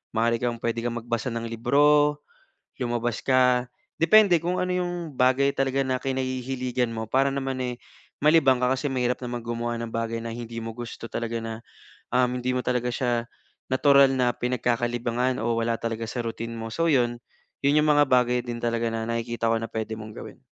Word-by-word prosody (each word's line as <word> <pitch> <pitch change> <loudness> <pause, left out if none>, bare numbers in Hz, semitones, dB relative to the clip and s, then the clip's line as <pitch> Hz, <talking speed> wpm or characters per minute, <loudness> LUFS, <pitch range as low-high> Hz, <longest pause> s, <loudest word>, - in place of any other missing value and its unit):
Maari 115 +1 +2
kang 120 -1 -1
pwede 115 0 -1
kang 120 -1 -1
magbasa 120 +2 -3
ng 115 0 -3
libro, 145 +5 +3 0.6
lumabas 120 -2 -1
ka, 125 -1 +3 0.3
depende 180 0 +6
kung 180 +2 -1
ano 180 0 0
yung 175 -4 -3
bagay 130 +2 +3
talaga 135 0 0
na 130 -1 -1
kinahihiligan 130 -2 -2
mo 110 0 -3
para 135 +4 +3
naman, 135 -1 -3
eh, 125 -1 -2 0.5
malibang 150 -4 +5
ka. 125 +1 +3
Kasi 140 +2 -2
mahirap 125 -1 0
naman 120 -1 -4
gumawa 120 0 -2
ng 115 -1 -5
bagay 115 0 -2
na 115 - -4
hindi 115 -1 -7
mo 115 - -5
gusto 120 -1 -7
talaga 115 0 -3
na, 115 0 -6 0.5
um, 125 0 +4
hindi 125 +1 -1
mo 125 - 0
talaga 125 -1 0
siya 120 -1 0 0.5
natural 140 0 +5
na 125 -2 +2
pinagkakalibangan 120 0 -1
o 115 0 0
wala 115 0 0
talaga 115 0 -3
sa 120 +2 -3
routine 115 0 -5
mo 115 0 -6
so 165 +8 0
yun, 120 -6 +2 0.5
yun 150 +2 +4
yung 150 - +3
mga 145 0 +5
bagay 125 -1 +3
din 120 -1 -5
talaga 115 0 0
na 115 - -2
nakikita 115 0 -1
ko 115 - +2
na 115 - -4
pwede 110 -1 -4
mong 110 0 -9
gawin. - - -10
125 Hz, 185 wpm, -25 LUFS, 115-135 Hz, 0.6 s, depende